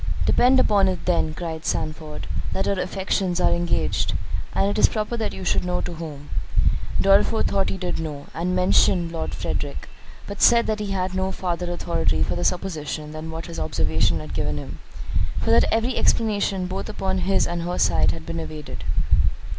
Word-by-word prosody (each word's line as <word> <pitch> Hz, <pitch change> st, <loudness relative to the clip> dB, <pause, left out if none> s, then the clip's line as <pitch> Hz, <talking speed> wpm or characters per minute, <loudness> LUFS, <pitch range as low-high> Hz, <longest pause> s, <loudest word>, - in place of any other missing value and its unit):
"Depend 260 Hz, +2 st, +5 dB
upon 200 Hz, -5 st, +4 dB
it 185 Hz, -1 st, -2 dB
then," 165 Hz, -3 st, +1 dB
cried 160 Hz, -1 st, -5 dB
Sandford, 155 Hz, -2 st, -3 dB, 0.3 s
"that 190 Hz, -, -1 dB
her 195 Hz, -2 st, 0 dB
affections 185 Hz, -1 st, -1 dB
are -, -, +3 dB
engaged; 175 Hz, 0 st, 0 dB, 0.4 s
and 195 Hz, -, +3 dB
it 205 Hz, +1 st, 0 dB
is -, -, +6 dB
proper 215 Hz, +2 st, -2 dB
that 225 Hz, -2 st, -2 dB
you 95 Hz, -, -7 dB
should 85 Hz, -, +2 dB
know 180 Hz, 0 st, -1 dB
to -, -, -4 dB
whom." 150 Hz, -3 st, -8 dB, 0.7 s
Dorriforth 200 Hz, +3 st, +4 dB
thought 195 Hz, -1 st, +1 dB
he -, -, -3 dB
did 180 Hz, -3 st, -3 dB
know, 150 Hz, -3 st, -5 dB
and 180 Hz, +2 st, -1 dB
mentioned 180 Hz, -1 st, +3 dB
Lord 165 Hz, -1 st, -3 dB
Frederick; -, -, -3 dB, 0.4 s
but 200 Hz, 0 st, -7 dB
said 235 Hz, 0 st, +6 dB
that 215 Hz, -1 st, -1 dB
he 210 Hz, -1 st, -3 dB
had 185 Hz, -1 st, -1 dB
no 190 Hz, 0 st, 0 dB
farther 180 Hz, -1 st, -2 dB
authority 80 Hz, -, 0 dB
for 90 Hz, +2 st, -1 dB
the 90 Hz, -, -2 dB
supposition 155 Hz, -, -2 dB
than 155 Hz, +1 st, -6 dB
what 160 Hz, +1 st, -5 dB
his 80 Hz, -, -6 dB
observation 80 Hz, 0 st, +1 dB
had -, -, -8 dB
given 75 Hz, 0 st, -1 dB
him, -, -, -7 dB, 0.6 s
for -, -, 0 dB
that 75 Hz, +1 st, +6 dB
every 230 Hz, +3 st, +1 dB
explanation 200 Hz, -4 st, +1 dB
both 190 Hz, +3 st, -4 dB
upon 190 Hz, -3 st, -1 dB
his 190 Hz, +2 st, +2 dB
and 175 Hz, 0 st, -2 dB
her 175 Hz, +1 st, -2 dB
side -, -, +3 dB
had 165 Hz, -1 st, -4 dB
been 165 Hz, -, -4 dB
evaded. 155 Hz, -, -7 dB
180 Hz, 185 wpm, -24 LUFS, 155-195 Hz, 0.7 s, is